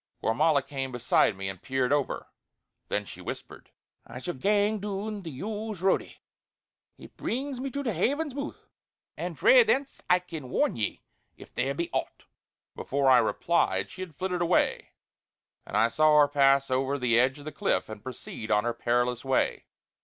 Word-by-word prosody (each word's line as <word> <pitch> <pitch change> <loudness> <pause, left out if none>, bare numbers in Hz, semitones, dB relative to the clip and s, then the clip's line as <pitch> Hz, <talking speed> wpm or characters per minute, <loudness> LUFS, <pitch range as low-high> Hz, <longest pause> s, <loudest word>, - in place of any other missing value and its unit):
Gormala 140 +5 +3
came 135 -2 -4
beside 120 -4 +2
me 95 0 -3
and 95 -2 -6
peered 130 0 0
over; 145 -2 -1 0.6
then 105 0 -1
she - - -10
whispered: - - -8 0.3
"I 115 - -10
shall 130 +8 -4
gang 205 +7 +1
doon 205 +1 -4
the 170 - -7
yowes' 205 +6 -5
roadie; 190 - +1 0.8
it - - -14
brings 265 +1 -3
me 270 +1 -3
to 280 +2 -4
the 230 -5 -1
Haven's 285 - 0
mooth, 280 +2 -6 0.5
and - - -5
frae - - +7
thence 285 - 0
I 180 - +6
can 165 -7 -8
warn - - +1
ye 110 -4 -3 0.3
if - - -14
there 135 +1 -1
be 170 +3 -3
aught!" - - -3 0.5
Before 135 -1 +1
I 125 - +8
replied 170 0 +1
she 185 - -9
had 175 -5 -7
flitted 180 +2 -2
away, 170 +1 +1 0.8
and - - -2
I 115 - +5
saw 155 +5 +4
her 145 - +6
pass 140 -1 +3
over 135 +2 +1
the 120 -3 +3
edge 130 +3 +2
of 145 - -12
the 155 - -5
cliff 195 +7 0
and 110 -1 -8
proceed 115 -2 -8
on 105 0 +3
her 120 0 -1
perilous 120 +1 0
way. 135 -1 0
145 Hz, 175 wpm, -28 LUFS, 125-200 Hz, 0.8 s, I